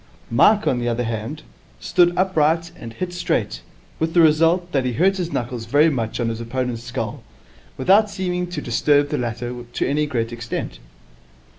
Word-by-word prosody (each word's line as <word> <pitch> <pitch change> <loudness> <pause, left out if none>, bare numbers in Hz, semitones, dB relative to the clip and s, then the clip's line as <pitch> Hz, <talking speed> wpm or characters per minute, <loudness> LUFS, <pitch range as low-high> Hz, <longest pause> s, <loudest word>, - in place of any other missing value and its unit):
Mike, 205 - +4
on 125 - +1
the 120 - -2
other 120 +1 -1
hand, 115 +7 -4 0.4
stood 175 - +3
upright 165 -2 +1
and 115 -8 -9
hit 180 +4 -5
straight, 165 - -1 0.4
with 160 +1 -1
the - - +6
result 165 +3 +4
that 135 -2 +1
he 125 -1 -1
hurt 190 - +2
his 175 -2 -3
knuckles 120 -1 -3
very 150 +6 +4
much 115 -5 -3
on 120 -1 0
his 115 0 -4
opponent's 120 0 -3
skull, 125 +1 -5 0.6
without 205 +3 +4
seeming 180 -2 -2
to 175 -4 -5
disturb 145 +4 +2
the - - -1
latter 120 +1 -4
to - - -1
any 150 +1 0
great 115 -4 -2
extent. 115 - -5
145 Hz, 175 wpm, -21 LUFS, 120-175 Hz, 0.6 s, the